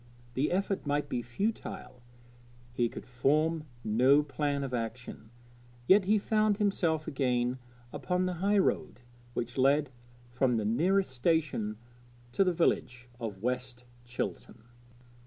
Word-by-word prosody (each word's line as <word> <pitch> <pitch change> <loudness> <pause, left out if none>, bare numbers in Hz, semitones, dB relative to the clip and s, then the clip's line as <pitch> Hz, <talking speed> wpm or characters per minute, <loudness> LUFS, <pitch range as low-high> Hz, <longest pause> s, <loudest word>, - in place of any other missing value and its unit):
The 135 +5 0
effort 190 -4 -1
might 145 0 0
be 125 - -1
futile; 130 - -4 0.7
he 120 -1 +1
could - - -9
form 150 +6 +1 0.2
no 130 +7 +4
plan 145 -1 -1
of 130 -2 -5
action; 115 -1 -5 0.6
yet 195 0 +6
he 210 +3 +4
found 215 0 +2
himself 175 -7 0
again 125 -2 0 0.3
upon 180 0 -1
the 185 - -1
highroad 200 -9 +1 0.3
which 120 +2 -3
led 140 +1 +3 0.4
from 125 -1 +1
the 110 - -1
nearest 170 - +2
station 130 -6 0 0.5
to 195 - +3
the 185 - +2
village 125 -7 0
of 105 -4 -6
West 125 0 -3 0.2
Chilton. 120 -1 -5
135 Hz, 125 wpm, -30 LUFS, 125-175 Hz, 0.7 s, yet